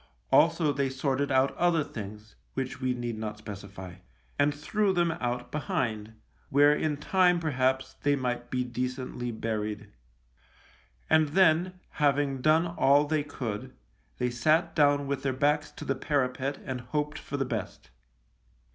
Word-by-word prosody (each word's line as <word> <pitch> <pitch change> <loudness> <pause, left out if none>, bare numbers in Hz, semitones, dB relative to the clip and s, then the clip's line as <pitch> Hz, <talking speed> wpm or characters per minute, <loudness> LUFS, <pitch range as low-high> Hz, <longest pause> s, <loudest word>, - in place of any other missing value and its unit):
Also 165 -2 +4
they 140 0 0
sorted 135 +1 -1
out 130 +1 +3
other 170 -3 +3
things, 105 -4 -9 0.2
which 130 0 -4
we 130 -1 0
need 120 -2 -4
not 105 -1 -4
specify, 100 -3 -9 0.4
and 145 +1 +4
threw 195 +8 0
them 175 -2 +2
out 120 0 -2
behind, 110 -6 -3 0.3
where 145 +2 +5
in 150 -1 -1
time 180 +3 +3
perhaps 130 -4 0
they 145 0 +3
might 125 -2 -3
be 125 -1 0
decently 125 0 -4
buried. 110 -2 -4 1.2
And 160 -1 +4
then, 180 +2 +3 0.2
having 140 -2 +2
done 155 +4 +4
all 145 -4 +3
they 150 0 0
could, 120 -7 -5 0.4
they 125 0 0
sat 155 +7 +2
down 145 -2 +4
with 140 -1 -2
their 135 -1 -1
backs 150 +3 +1
to - - -8
the 135 - +1
parapet 135 0 -1
and 130 -3 -4
hoped 150 +4 -3
for 140 - -5
the 135 - 0
best. 65 - -5
135 Hz, 145 wpm, -28 LUFS, 120-150 Hz, 1.2 s, where